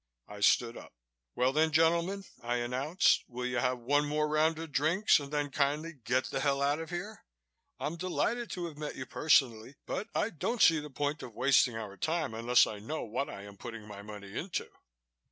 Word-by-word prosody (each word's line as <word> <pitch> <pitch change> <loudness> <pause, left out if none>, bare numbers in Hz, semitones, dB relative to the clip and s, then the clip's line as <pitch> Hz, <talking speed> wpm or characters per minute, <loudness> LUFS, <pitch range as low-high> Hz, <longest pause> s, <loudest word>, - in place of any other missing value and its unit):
I 105 0 -10
stood 115 +3 +3
up. - - -12 0.4
"Well, 130 +1 +2
then, 160 +2 +3
gentlemen," 170 +5 +2 0.2
I 120 +1 -1
announced, 130 +9 +2
"will 125 0 -5
you 125 -1 -1
have 125 +1 +1
one 145 +5 +1
more 150 +1 +1
round 155 +1 +2
of 165 -1 -7
drinks 160 +10 +3
and 140 -1 -8
then 145 -1 -1
kindly 150 +4 0
get 130 -1 -1
the - - -1
hell 140 0 +1
out 145 +2 +1
of 165 -1 -6
here? 190 +5 -6 0.6
I'm 160 +3 -3
delighted 215 +7 -1
to 175 -2 -3
have 155 -3 -8
met 150 -1 -4
you 130 - -5
personally 130 -5 +2
but 210 - -3
I 225 - +1
don't 225 - -2
see 165 -5 +6
the 150 0 -7
point 145 +2 -2
of 115 - -9
wasting 125 -1 +4
our 105 -3 -6
time 160 - -1
unless 120 +2 +4
I 105 - -6
know 150 +10 -4
what 120 +5 -3
I 100 - -8
am 100 0 -12
putting 115 -2 -8
my 100 -1 -9
money 100 -1 -10
into." 175 +1 -3
145 Hz, 205 wpm, -31 LUFS, 120-160 Hz, 0.6 s, see